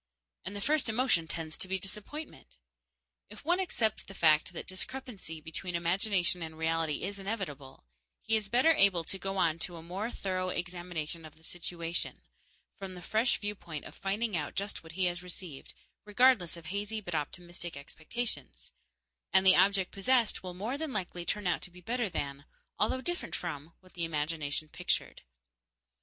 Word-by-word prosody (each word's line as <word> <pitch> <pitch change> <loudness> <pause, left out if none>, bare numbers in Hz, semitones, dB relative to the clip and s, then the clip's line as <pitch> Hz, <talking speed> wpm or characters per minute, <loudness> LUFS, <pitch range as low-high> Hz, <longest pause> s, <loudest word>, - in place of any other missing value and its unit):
And 200 - -5
the 200 - -4
first 300 0 +3
emotion 220 -8 +3
tends 160 -1 -3
to - - -1
be 190 +1 +1
disappointment. 210 - -6 0.7
If 210 +6 -12
one 350 +3 +4
accepts 230 - +1
the 195 - -12
fact 155 -1 +5
that 175 - -6
discrepancy 190 -5 -5
between 170 +3 -4
imagination 180 +1 +2
and 160 -1 -5
reality 160 -1 +1
is 200 +2 -2
inevitable, 180 - -4 0.3
he 225 - +2
is 210 -2 +1
better 255 +8 +6
able 195 - +6
to 190 +4 -4
go 195 +1 -2
on 165 -3 +3
to 175 +1 -3
a 165 - -8
more 190 +7 -2
thorough 185 -5 -1
examination 175 -3 -3
of 155 -1 -11
the 160 - -22
situation, 170 0 -3 0.6
from 190 -2 -5
the 180 - -9
fresh 220 +7 +3
viewpoint 180 -7 -4
of - - -9
finding 205 +2 -1
out 150 -3 -2
just 200 +1 -2
what 165 0 -11
he 185 +1 +2
has 175 0 0
received, 180 -5 -7 0.3
regardless 210 -5 +4
of 170 - -11
hazy 205 +5 -2
but 175 -5 -6
optimistic 175 +1 -3
expectations; 145 - -5 0.6
and 190 - +6
the 185 - +10
object 190 0 +4
possessed 235 +3 +3
will 180 -1 -6
more 225 +9 -2
than 315 -3 -2
likely 180 -3 -2
turn 210 +1 -1
out 175 -2 +2
to - - -6
be 180 +1 -13
better 235 +4 0
than, 140 -4 -3 0.3
although 240 +5 +2
different 350 +5 -2
from, 165 -2 -4
what 185 -1 -19
the 170 - -2
imagination 155 -1 -1
pictured. 165 +3 -1
180 Hz, 175 wpm, -32 LUFS, 165-210 Hz, 0.7 s, the